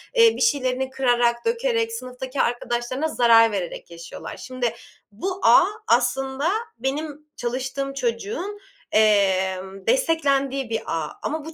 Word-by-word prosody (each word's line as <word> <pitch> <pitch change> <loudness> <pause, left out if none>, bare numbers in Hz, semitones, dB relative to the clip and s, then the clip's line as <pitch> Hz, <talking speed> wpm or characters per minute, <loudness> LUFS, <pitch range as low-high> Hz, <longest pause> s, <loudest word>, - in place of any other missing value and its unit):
eee, 460 -1 +6
bir - - -6
şeylerini 265 - +1
kırarak, 245 -2 +1
dökerek, 460 -1 0
sınıftaki 255 - -4
arkadaşlarına 240 +4 -1
zarar 230 -5 +5
vererek 180 -3 -5
yaşıyorlar. 170 0 -9
Şimdi 250 -3 -3 0.4
bu 370 - -4
ağ 290 +10 +7 0.2
aslında 270 +4 +1 0.3
benim 300 +2 -4
çalıştığım 265 +3 -3
çocuğun, 255 - -3 0.3
emm, 190 -2 +2
desteklendiği 275 - +1
bir 225 - -1
ağ. 160 -2 -2
Ama 310 0 -3
bu 325 - -8
260 Hz, 120 wpm, -23 LUFS, 230-305 Hz, 0.4 s, ağ